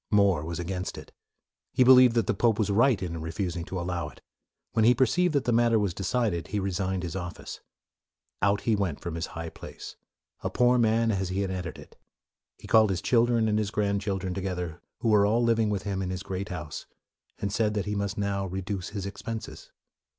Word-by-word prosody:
More 100 -7 +3
was 85 +1 -4
against 90 +1 -4
it, - - -10 0.6
He 130 - +5
believed 125 -1 +7
that 115 - +2
the - - +1
pope 115 -3 +2
was 105 -2 +1
right 115 +2 +4
in 85 -2 -4
refusing 85 +1 -3
to 95 - -4
allow 85 -3 -3
it. 65 - -17 0.5
When 110 - +2
he 120 +3 +6
perceived 155 +7 +2
that 140 - +2
the 120 - 0
matter 115 0 +4
was 100 -4 0
decided, 95 -3 -1
he 105 - -2
resigned 95 -1 -1
his 85 0 -4
office. 90 -2 -6 0.8
Out 100 +1 +2
he 115 - +2
went 95 -7 -1
from 85 - -5
his 85 +1 -3
high 80 0 -4
place, - - -10 0.4
a - - -2
poor 125 0 +3
man 115 0 +3
as 95 -3 -1
he 95 +2 -1
had 95 -1 -1
entered 90 -3 -5
it. - - -15 0.6
He - - -14
called 110 -1 +5
his 95 -3 -2
children 115 -2 +3
and 105 0 +2
his 105 -2 -1
grand 100 -1 0
children 95 -3 -2
together, 90 -3 -4 0.2
who 115 - +1
were 105 -2 +5
all 115 +3 +2
living 115 -2 +2
with 100 -2 -2
him 100 -2 -2
in 90 - -2
his 95 0 -4
great 95 +2 -4
house, 80 -5 -6 0.5
and 100 -1 -3
said 105 -1 +1
that 100 -2 -1
he 105 - -2
must 100 0 -2
now 100 -1 -1
reduce 95 0 -4
his 100 -2 -5
expenses. 110 +3 -7
100 Hz, 210 wpm, -27 LUFS, 90-110 Hz, 0.8 s, believed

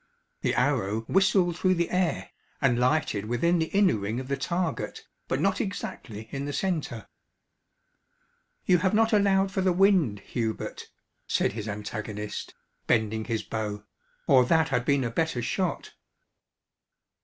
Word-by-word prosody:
The - - 0
arrow 105 +3 +1
whistled 185 - +2
through 185 -1 +3
the 170 0 -1
air, 180 -2 0 0.3
and 125 -4 +2
lighted 125 -6 +1
within 150 +10 +1
the 160 - 0
inner 195 - +3
ring 105 +4 -3
of 130 0 -7
the 140 - +1
target, 175 +5 -3 0.2
but - - -1
not 195 -1 +1
exactly 115 - -6
in 140 0 -4
the 145 - -4
centre. 155 - -2 1.6
"You 180 -1 +4
have 190 +3 +1
not 225 +1 +3
allowed 195 -2 +3
for 190 - -1
the 185 0 +3
wind, 175 - +3
Hubert," 110 +1 -4 0.4
said - - +1
his 110 0 -5
antagonist, 105 0 -5 0.3
bending 110 0 +1
his 115 -2 -2
bow, 105 -2 -4 0.4
"or 130 -2 +6
that 160 +4 +3
had 125 -3 0
been 140 -1 +2
a 120 - -2
better 160 0 0
shot." 185 +8 -2
140 Hz, 145 wpm, -27 LUFS, 110-185 Hz, 1.6 s, or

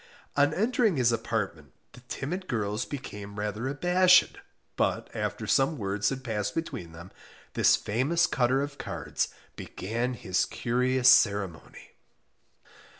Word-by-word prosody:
On 145 0 +4
entering 225 - +2
his 120 -2 +3
apartment, 105 - -3 0.2
the - - -14
timid 180 +7 -4
girls 105 -1 -2
became 105 -7 -8
rather 105 +4 -3
abashed, 180 +6 +4 0.4
but - - -1
after - - -3
some 135 +4 +2
words 100 -1 -1
had 135 -1 -5
passed 105 -4 -3
between 90 - -4
them, 85 +3 -12 0.4
this - - +5
famous 140 +11 +1
cutter 130 +1 +1
of 145 0 -7
cards - - -3 0.3
began 120 +6 -3
his 95 -5 0
curious 125 +1 0
ceremony. 100 - +2
120 Hz, 125 wpm, -28 LUFS, 100-145 Hz, 0.4 s, this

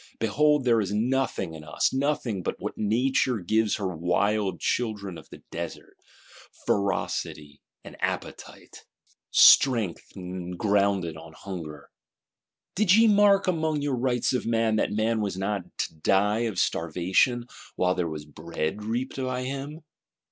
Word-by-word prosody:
Behold 150 +6 +2
there 115 -2 +4
is 100 -1 -3
nothing 115 -5 -1
in 80 -1 -9
us; 75 +10 0
nothing 135 -7 -1
but - - -4
what - - -5
Nature 125 +3 +1
gives 110 +3 +1
her 95 -4 -3
wild 95 +3 0
children 105 -6 -2
of - - -12
the - - -13
desert: 85 0 -7 0.7
Ferocity 100 -6 -2 0.2
and - - -11
Appetite; - - -5 0.5
Strength 115 -10 +5 0.4
grounded 100 -5 +1
on 80 0 -12
Hunger. 80 -6 -8 0.8
Did 195 0 +4
ye 225 +1 +6
mark 205 -2 +5
among 160 -4 0
your 145 -2 0
Rights 125 0 0
of 125 - -1
Man, 115 -1 +1
that - - 0
man 110 +1 0
was 100 -3 -3
not 100 -1 -2
to - - -2
die 105 +8 +1
of 100 - -7
starvation, 90 +10 +1 0.3
while 90 0 +2
there 90 -2 -2
was 75 -1 -6
bread 80 +5 -4
reaped 120 +5 -3
by 130 -1 -2
him? 140 +4 -5
105 Hz, 140 wpm, -26 LUFS, 90-130 Hz, 0.8 s, ye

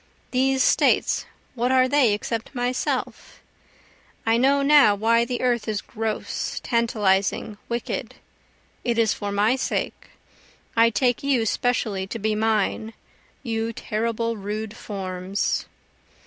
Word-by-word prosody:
These 265 0 +2
States, - - +2 0.3
what 245 +1 0
are 255 0 +4
they 255 -5 +4
except 225 +4 -5
myself? 245 +1 -2 0.9
I 225 0 +3
know 275 +4 +3
now 280 -7 +6
why 230 +3 +3
the 245 0 -3
earth 240 -3 +1
is 215 -2 -1
gross, 220 0 -4
tantalizing, 210 -3 +1
wicked, 235 0 -3 0.7
it 235 -1 0
is 225 -2 +3
for 205 0 -4
my 210 +5 +2
sake, 265 - -3 0.7
I 230 0 +5
take 245 +2 +1
you 270 -5 +1
specially 215 -5 0
to 230 - -5
be 220 0 0
mine, 220 0 0 0.5
you 225 -2 -2
terrible, 230 +1 -2
rude 210 +2 -5
forms. 190 -2 -3
230 Hz, 120 wpm, -24 LUFS, 210-245 Hz, 0.9 s, now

